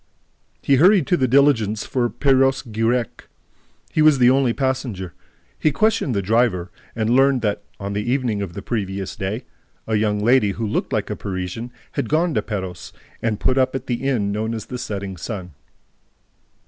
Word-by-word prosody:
He 140 Hz, -, +4 dB
hurried 180 Hz, +2 st, +5 dB
to 180 Hz, -, +2 dB
the 130 Hz, -6 st, +1 dB
diligence 120 Hz, -6 st, +3 dB
for 120 Hz, -2 st, 0 dB
Perros 135 Hz, 0 st, +2 dB
Guirec. 115 Hz, +1 st, -1 dB, 0.6 s
He 155 Hz, -, +1 dB
was 155 Hz, -2 st, +6 dB
the 125 Hz, -1 st, +5 dB
only 135 Hz, -2 st, +3 dB
passenger. 125 Hz, -, -2 dB, 0.5 s
He 155 Hz, -, +2 dB
questioned 195 Hz, -, +1 dB
the 100 Hz, -, 0 dB
driver 105 Hz, -4 st, +1 dB, 0.2 s
and 110 Hz, -1 st, -1 dB
learned 135 Hz, 0 st, +4 dB
that, 105 Hz, -1 st, 0 dB, 0.2 s
on 100 Hz, 0 st, -4 dB
the 105 Hz, -, -1 dB
evening 120 Hz, -3 st, -1 dB
of 95 Hz, -4 st, -5 dB
the 100 Hz, -, -7 dB
previous 100 Hz, -4 st, -3 dB
day, 105 Hz, +4 st, -4 dB, 0.4 s
a 110 Hz, -, -3 dB
young 105 Hz, -1 st, +1 dB
lady 105 Hz, -1 st, +3 dB
who 115 Hz, +3 st, -3 dB
looked 105 Hz, -, -2 dB
like -, -, -1 dB
a -, -, -2 dB
Parisian 95 Hz, +5 st, -5 dB, 0.2 s
had 115 Hz, -, -3 dB
gone 165 Hz, +2 st, +2 dB
to -, -, +1 dB
Perros 95 Hz, -5 st, -6 dB, 0.3 s
and 110 Hz, -2 st, -1 dB
put 130 Hz, +1 st, +2 dB
up 130 Hz, 0 st, +1 dB
at 135 Hz, -, -4 dB
the 120 Hz, -1 st, -2 dB
inn 120 Hz, -7 st, 0 dB
known 110 Hz, +2 st, -2 dB
as 110 Hz, -, -6 dB
the 125 Hz, -, -6 dB
Setting 100 Hz, -5 st, -5 dB
Sun. 90 Hz, +1 st, -6 dB
115 Hz, 180 wpm, -21 LUFS, 100-130 Hz, 0.6 s, was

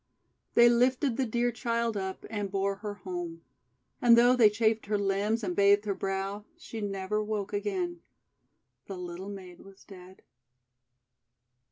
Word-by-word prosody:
They 235 Hz, -, +8 dB
lifted 250 Hz, +2 st, +2 dB
the 260 Hz, 0 st, 0 dB
dear 240 Hz, +2 st, 0 dB
child 235 Hz, -1 st, -1 dB
up, 190 Hz, -1 st, -4 dB
and 205 Hz, -2 st, -3 dB
bore 195 Hz, 0 st, -1 dB
her 205 Hz, 0 st, -6 dB
home. 175 Hz, -3 st, -6 dB, 0.6 s
And 235 Hz, -1 st, +7 dB
though 245 Hz, +2 st, +6 dB
they 230 Hz, -4 st, +6 dB
chafed 220 Hz, 0 st, 0 dB
her 210 Hz, 0 st, +1 dB
limbs 200 Hz, +3 st, 0 dB
and 180 Hz, -3 st, -2 dB
bathed 200 Hz, +1 st, +4 dB
her 200 Hz, -, 0 dB
brow, 195 Hz, +2 st, -3 dB
she 225 Hz, -, -8 dB
never 200 Hz, +1 st, -2 dB
woke 210 Hz, -2 st, -3 dB
again. 345 Hz, -, -2 dB, 0.9 s
The 195 Hz, -, -6 dB
little 180 Hz, +2 st, -7 dB
maid 185 Hz, -3 st, -9 dB
was 195 Hz, 0 st, -16 dB
dead. 185 Hz, -1 st, -14 dB
205 Hz, 150 wpm, -29 LUFS, 195-230 Hz, 0.9 s, They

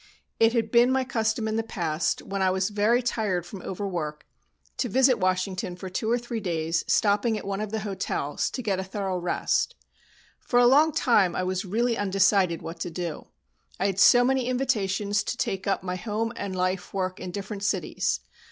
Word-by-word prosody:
It 225 Hz, 0 st, +5 dB
had 225 Hz, -2 st, 0 dB
been 240 Hz, +2 st, +5 dB
my 265 Hz, 0 st, +2 dB
custom 225 Hz, -2 st, -1 dB
in 220 Hz, 0 st, -1 dB
the -, -, +2 dB
past, 170 Hz, -7 st, -2 dB
when 195 Hz, 0 st, -4 dB
I 190 Hz, -, +3 dB
was 190 Hz, +1 st, 0 dB
very 215 Hz, +4 st, +2 dB
tired 205 Hz, -7 st, -1 dB
from 185 Hz, +1 st, -9 dB
overwork, 175 Hz, -6 st, -4 dB, 0.5 s
to 245 Hz, -, -1 dB
visit 260 Hz, +2 st, +4 dB
Washington 185 Hz, 0 st, -1 dB
for 185 Hz, +1 st, -8 dB
two 220 Hz, +4 st, -2 dB
or 240 Hz, -, +3 dB
three 240 Hz, -1 st, -4 dB
days, 165 Hz, -4 st, -1 dB
stopping 210 Hz, +2 st, +2 dB
at 210 Hz, -, -7 dB
one 195 Hz, +1 st, -2 dB
of 215 Hz, -, -3 dB
the 220 Hz, +1 st, -3 dB
hotels, 190 Hz, -7 st, -2 dB
to 255 Hz, -, -5 dB
get 195 Hz, -4 st, 0 dB
a -, -, -2 dB
thorough 190 Hz, -1 st, -3 dB
rest. 175 Hz, 0 st, 0 dB, 0.6 s
For 245 Hz, -, -1 dB
a 245 Hz, -, +6 dB
long 295 Hz, +6 st, +5 dB
time 220 Hz, -, +3 dB
I -, -, -1 dB
was 185 Hz, +1 st, -2 dB
really 230 Hz, +5 st, 0 dB
undecided 190 Hz, -3 st, +2 dB
what 165 Hz, +1 st, -7 dB
to 175 Hz, -, -3 dB
do, 170 Hz, -2 st, -5 dB, 0.5 s
I 190 Hz, -, 0 dB
had 195 Hz, -1 st, 0 dB
so 245 Hz, +4 st, +7 dB
many 260 Hz, -1 st, +1 dB
invitations 210 Hz, -6 st, 0 dB
to 245 Hz, -, -3 dB
take 190 Hz, 0 st, -2 dB
up 195 Hz, -, 0 dB
my 180 Hz, -1 st, -3 dB
home 225 Hz, +3 st, -2 dB
and 200 Hz, -2 st, -4 dB
life 185 Hz, +1 st, -2 dB
work 185 Hz, -1 st, -2 dB
in 185 Hz, -, -6 dB
different 200 Hz, +2 st, -6 dB
cities. 190 Hz, -, -1 dB
200 Hz, 200 wpm, -26 LUFS, 185-225 Hz, 0.6 s, so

